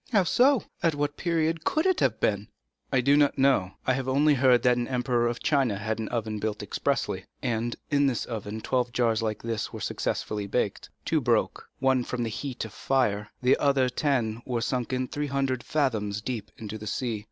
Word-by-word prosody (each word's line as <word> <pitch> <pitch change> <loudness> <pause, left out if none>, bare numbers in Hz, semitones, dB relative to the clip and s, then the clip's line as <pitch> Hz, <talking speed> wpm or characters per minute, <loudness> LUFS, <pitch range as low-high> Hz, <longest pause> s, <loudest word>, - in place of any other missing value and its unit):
"How 205 -5 +4
so?—at 230 - +2
what 145 0 -1
period 165 -1 0
can 310 - +1
that 375 -2 +2
have - - +1
been?" 100 0 0 0.4
"I 130 - +3
do 140 +3 +4
not 145 -1 +3
know; 130 -9 +3
I 130 - +3
have 130 0 -2
only 145 +3 +4
heard 130 -3 +4
that 125 -1 +5
an 120 -1 -2
emperor 125 -2 +1
of 120 0 -3
China 135 -9 +2
had 110 +2 -3
an 110 - -3
oven 110 -2 -2
built 105 0 -3
expressly, - - -1 0.2
and 120 0 -1
that - - -13
in 145 0 +4
this 125 -4 -1
oven 110 -1 -5
twelve 125 0 0
jars 115 -3 +2
like 110 -1 -3
this 115 -2 -3
were - - -7
successively 105 -1 -2
baked. 100 -1 -1 0.2
Two - - +1
broke, - - 0
from 130 -2 +1
the 115 - -2
heat 125 +2 -4
of 110 - -9
the - - -16
fire; 105 -6 +1
the 125 - +5
other 135 -3 +2
ten 120 -4 0
were 125 -2 -2
sunk 125 0 -1 0.2
three 145 0 -2
hundred 135 -2 -1
fathoms 110 -9 0
deep 110 -2 -4
into 110 0 -6
the 105 - -7
sea. 115 -1 -2
125 Hz, 200 wpm, -27 LUFS, 110-140 Hz, 0.4 s, that